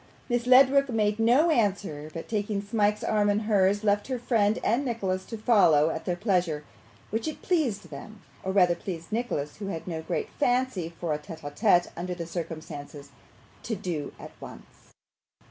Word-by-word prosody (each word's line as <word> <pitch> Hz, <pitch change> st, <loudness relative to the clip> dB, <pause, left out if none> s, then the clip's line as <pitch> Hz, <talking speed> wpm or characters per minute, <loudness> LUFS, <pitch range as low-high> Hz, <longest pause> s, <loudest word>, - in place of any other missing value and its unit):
Miss 240 Hz, 0 st, 0 dB
Ledrook 270 Hz, +2 st, +6 dB
made 215 Hz, -2 st, +1 dB
no 255 Hz, +9 st, +4 dB
answer, 195 Hz, -, 0 dB
but 165 Hz, +1 st, -7 dB
taking 205 Hz, -1 st, -1 dB
Smike's 210 Hz, 0 st, 0 dB
arm 210 Hz, -1 st, +2 dB
in 205 Hz, +1 st, +1 dB
hers, 205 Hz, -1 st, +2 dB
left 205 Hz, -1 st, +1 dB
her 260 Hz, -1 st, -2 dB
friend 220 Hz, -3 st, +1 dB
and 240 Hz, +6 st, +2 dB
Nicholas 195 Hz, -7 st, -2 dB
to 225 Hz, -, -6 dB
follow 170 Hz, -9 st, +4 dB
at 160 Hz, -, -5 dB
their 180 Hz, -, 0 dB
pleasure; 175 Hz, -6 st, 0 dB, 0.5 s
which 225 Hz, +7 st, -2 dB
it 310 Hz, -, -6 dB
pleased 245 Hz, -, 0 dB
them, 205 Hz, +9 st, -10 dB, 0.2 s
or 190 Hz, -, -2 dB
rather 180 Hz, -3 st, +4 dB
pleased 170 Hz, 0 st, -7 dB
Nicholas, 210 Hz, -11 st, -2 dB
who 200 Hz, -, -6 dB
had 165 Hz, -5 st, -5 dB
no 165 Hz, -2 st, -3 dB
great -, -, -3 dB
fancy 245 Hz, -, +1 dB
for 165 Hz, -3 st, -1 dB
a 150 Hz, -, -2 dB
TETE 160 Hz, +1 st, -10 dB
A 145 Hz, -, -5 dB
TETE 175 Hz, +1 st, +3 dB
under 180 Hz, +1 st, -4 dB
the 170 Hz, -1 st, -5 dB
circumstances, 155 Hz, -4 st, -7 dB, 0.5 s
to 225 Hz, -, -3 dB
do 175 Hz, -7 st, -4 dB
at -, -, -9 dB
once. -, -, -13 dB
205 Hz, 180 wpm, -27 LUFS, 170-225 Hz, 0.5 s, Ledrook